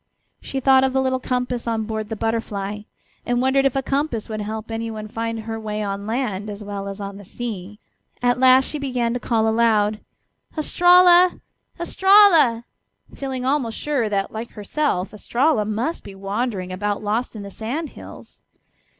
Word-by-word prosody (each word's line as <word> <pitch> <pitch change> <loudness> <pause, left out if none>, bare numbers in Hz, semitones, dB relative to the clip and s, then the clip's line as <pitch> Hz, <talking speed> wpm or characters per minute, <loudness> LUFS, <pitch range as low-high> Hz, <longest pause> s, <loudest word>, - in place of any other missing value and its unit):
She 270 - -4
thought 265 0 +5
of 265 -1 +1
the 265 - +2
little 260 -1 0
compass 250 -1 -2
on 225 -1 0
board 215 -1 -4
the 220 - -3
Butterfly, 210 -2 -2 0.4
and 245 0 0
wondered 270 +2 +3
if 270 - -4
a 270 - 0
compass 275 -6 -2
would 215 -1 -4
help 220 +2 -5
anyone 225 -1 -4
find 230 +1 -4
her 225 0 -5
way 215 -1 -3
on 200 0 -4
land 215 -4 -2
as 205 0 -7
well 200 -1 -5
as 195 +1 -6
on 200 -1 -6
the 205 - -11
sea. 210 -1 -7 0.4
At 245 0 +1
last 260 0 +6
she 300 - -4
began 250 -4 -1
to 245 - -2
call 225 -2 +1
aloud: 220 -2 +2 0.6
"Estralla! 355 +3 +5 0.4
Estralla!" 345 - +5 0.5
feeling 265 -2 -4
almost 260 -5 0
sure 275 -7 -1
that, 195 -1 -1
like 225 +2 -7
herself, 210 -3 -2
Estralla 240 +3 +1
must 225 +10 -2
be 200 - -10
wandering 195 -1 -3
about 205 +3 -2
lost 225 +4 -1
in 210 - -6
the 200 - -8
sand 270 - -4
hills. - - -13
230 Hz, 170 wpm, -22 LUFS, 210-265 Hz, 0.6 s, last